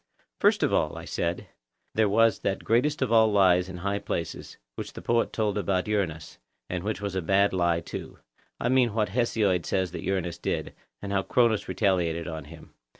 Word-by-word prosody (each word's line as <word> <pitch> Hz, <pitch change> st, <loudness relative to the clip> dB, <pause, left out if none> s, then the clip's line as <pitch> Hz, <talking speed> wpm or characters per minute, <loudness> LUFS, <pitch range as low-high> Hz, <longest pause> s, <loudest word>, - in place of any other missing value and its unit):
First -, -, +3 dB
of -, -, +1 dB
all, -, -, +1 dB
I -, -, -8 dB
said, 85 Hz, +1 st, -2 dB, 0.5 s
there 110 Hz, -1 st, +2 dB
was 115 Hz, +1 st, +3 dB
that 95 Hz, -, -2 dB
greatest 135 Hz, +6 st, +2 dB
of 125 Hz, -, -2 dB
all 110 Hz, -1 st, +5 dB
lies 95 Hz, -2 st, +4 dB
in 90 Hz, -, -7 dB
high 100 Hz, +3 st, -2 dB
places, 85 Hz, -4 st, -5 dB, 0.2 s
which -, -, -7 dB
the -, -, -8 dB
poet 115 Hz, 0 st, +1 dB
told 105 Hz, -2 st, 0 dB
about 95 Hz, -2 st, 0 dB
Uranus, 90 Hz, -8 st, -2 dB, 0.3 s
and 90 Hz, -1 st, -3 dB
which 105 Hz, 0 st, -3 dB
was 100 Hz, -2 st, -3 dB
a 95 Hz, -, -1 dB
bad 100 Hz, +4 st, +2 dB
lie 85 Hz, -2 st, +1 dB
too,—I 115 Hz, -, -8 dB
mean 125 Hz, -4 st, +3 dB
what 105 Hz, -3 st, +1 dB
Hesiod 105 Hz, -5 st, +1 dB
says 95 Hz, -2 st, -1 dB
that -, -, -6 dB
Uranus 90 Hz, -3 st, -2 dB
did, -, -, -3 dB, 0.3 s
and 100 Hz, -, -4 dB
how 100 Hz, -1 st, +2 dB
Cronus 115 Hz, +1 st, +2 dB
retaliated 85 Hz, -5 st, 0 dB
on 80 Hz, -3 st, -6 dB
him. 80 Hz, +1 st, -14 dB
100 Hz, 190 wpm, -27 LUFS, 90-110 Hz, 0.5 s, all